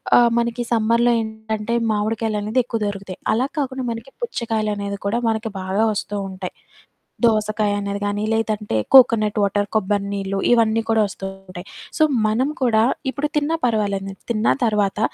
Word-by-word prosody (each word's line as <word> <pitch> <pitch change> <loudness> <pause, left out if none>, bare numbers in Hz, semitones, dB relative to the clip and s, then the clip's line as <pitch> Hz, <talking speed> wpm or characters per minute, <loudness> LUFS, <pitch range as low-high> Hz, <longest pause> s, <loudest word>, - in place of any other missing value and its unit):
ఆహ్, 240 -1 +6
మనకి 235 +1 0
సమ్మర్‌లో 230 +1 +3
ఏంటంటే, 220 0 -4 0.2
మామిడికాయలనేది 215 +2 -1
ఎక్కువ 230 -2 -3
దొరుకుతాయి. 195 -2 -4
అలా 245 +4 +2
కాకుండా 265 -2 -2
మనకి 230 +3 -6
పుచ్చకాయలు 225 - -2
అనేది 200 0 -4
కూడా, 215 +4 +1
మనకి 225 0 -1
బాగా 190 +3 0
వస్తూ 205 0 -4
ఉంటాయి. 185 -1 -6 0.7
దోసకాయ 215 -2 +1
అనేది 200 0 -3
కానీ, 205 +1 -1
లేదంటే, 215 - -1 0.2
కోకోనట్ 225 -5 +6
వాటర్, 205 0 +1
కొబ్బరి 200 0 0
నీళ్లు, 195 0 -2
ఇవన్నీ 225 -1 +3
కూడా 225 -1 +4
వస్తూ 195 0 -6 0.2
ఉంటాయి. 180 +1 -9 0.3
సో, - - +6 0.2
మనం 250 +7 +1
కూడా, 220 -3 +4 0.3
ఇప్పుడు 295 +2 -2
తిన్నా 310 +3 +1
పర్వాలేదు. 200 -3 0
నేను 195 - -11
తిన్న 215 -1 +2
తరవాత, 210 -2 +1
215 Hz, 150 wpm, -21 LUFS, 205-230 Hz, 0.7 s, ఆహ్